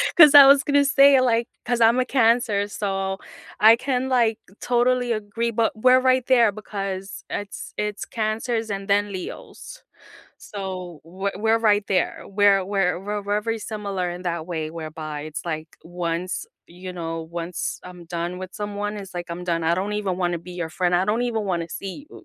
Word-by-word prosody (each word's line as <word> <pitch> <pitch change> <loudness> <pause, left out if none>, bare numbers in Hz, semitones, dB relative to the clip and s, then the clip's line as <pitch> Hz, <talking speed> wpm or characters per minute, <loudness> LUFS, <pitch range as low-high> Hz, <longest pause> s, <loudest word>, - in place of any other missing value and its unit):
'Cause 300 -4 +9
I 280 -1 +12
was 280 0 +6
gonna 285 0 +3
say 275 -1 +6
like 235 -2 +2 0.2
cause 240 -1 0
I'm 230 +3 +5
a 255 - +1
Cancer, 230 -5 +2
so 195 -2 -3 0.4
I 220 +2 +8
can 260 +1 -2
like 235 -4 +2 0.2
totally 245 0 +1
agree 225 +2 -2
but 225 0 +1
we're 255 +3 +5
right 255 -1 +2
there 235 -5 +5
because 195 -2 -6
it's 205 -1 -6
it's 210 0 -3
Cancers 225 +1 -2
and 195 0 -4
then 205 0 +2
Leos. 190 - -8 0.6
So, 185 -5 -7
we 190 +4 -4
we're 225 +1 +2
right 210 -2 +3
there. 185 -2 0
We're 200 -1 +3
we're 195 -2 0 0.2
we're 205 +1 0
very 225 +1 -2
similar 200 -5 -4
in 175 +1 -7
that 170 -2 -3
way 160 -3 -4
whereby 155 -2 -6
it's 155 +1 -7
like, 160 -1 -4
once, 175 +1 -4 0.2
you 180 +2 -9
know 165 -2 -4
once 170 +1 -4
I'm 180 -1 -11
done 175 +1 -4
with 185 0 -8
someone, 205 0 -4
it's 195 -2 -9
like, 175 0 -4
"I'm 175 +1 -5
done. 165 -2 -1
I 170 +1 +3
don't 200 +3 -2
even 195 -4 -2
wanna 175 -1 0
be 180 +2 -11
your 175 -2 -4
friend, 175 0 0
I 180 +2 +3
don't 225 +4 +1
even 225 -3 -1
wanna 170 -3 -2
see 200 - -7
you." - - -13
200 Hz, 185 wpm, -23 LUFS, 180-230 Hz, 0.6 s, I